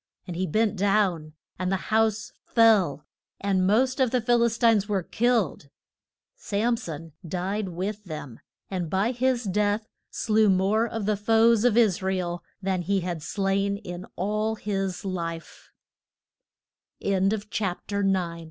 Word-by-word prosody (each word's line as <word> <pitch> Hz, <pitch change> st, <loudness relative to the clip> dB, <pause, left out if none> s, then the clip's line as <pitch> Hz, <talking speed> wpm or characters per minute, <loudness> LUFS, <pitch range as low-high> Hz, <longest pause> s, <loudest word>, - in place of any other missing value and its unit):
And 180 Hz, -, -6 dB
he 185 Hz, +2 st, -1 dB
bent 215 Hz, +5 st, +1 dB
down, 190 Hz, -6 st, +1 dB, 0.3 s
and 185 Hz, 0 st, -1 dB
the -, -, +2 dB, 0.2 s
house 220 Hz, -1 st, +2 dB, 0.2 s
fell, 210 Hz, -, +4 dB, 0.3 s
and 190 Hz, -2 st, +1 dB
most 255 Hz, +6 st, +2 dB
of 260 Hz, -2 st, +3 dB
the 250 Hz, -, +1 dB
Phil 240 Hz, +1 st, +2 dB
is 235 Hz, -1 st, +2 dB
tines 225 Hz, -4 st, +3 dB
were 195 Hz, -3 st, 0 dB
killed. 225 Hz, -, 0 dB, 0.7 s
Sam 235 Hz, -, 0 dB
son 165 Hz, -8 st, -7 dB
died 185 Hz, +4 st, -3 dB
with 200 Hz, +4 st, -4 dB
them, 150 Hz, -8 st, -7 dB, 0.3 s
and 180 Hz, -4 st, -2 dB
by 195 Hz, +7 st, +1 dB
his 250 Hz, 0 st, 0 dB
death 205 Hz, +2 st, 0 dB, 0.2 s
slew 215 Hz, -2 st, +2 dB
more 195 Hz, +5 st, +2 dB
of 225 Hz, -3 st, -4 dB
the 210 Hz, 0 st, +2 dB
foes 225 Hz, +2 st, +4 dB
of 240 Hz, -2 st, +3 dB
Is 210 Hz, -5 st, +3 dB
ra 190 Hz, 0 st, 0 dB
el 175 Hz, -1 st, -3 dB, 0.2 s
than 190 Hz, -2 st, 0 dB
he 195 Hz, +2 st, 0 dB
had 175 Hz, -2 st, -3 dB
slai 195 Hz, +4 st, -1 dB
205 Hz, 125 wpm, -26 LUFS, 185-225 Hz, 0.7 s, fell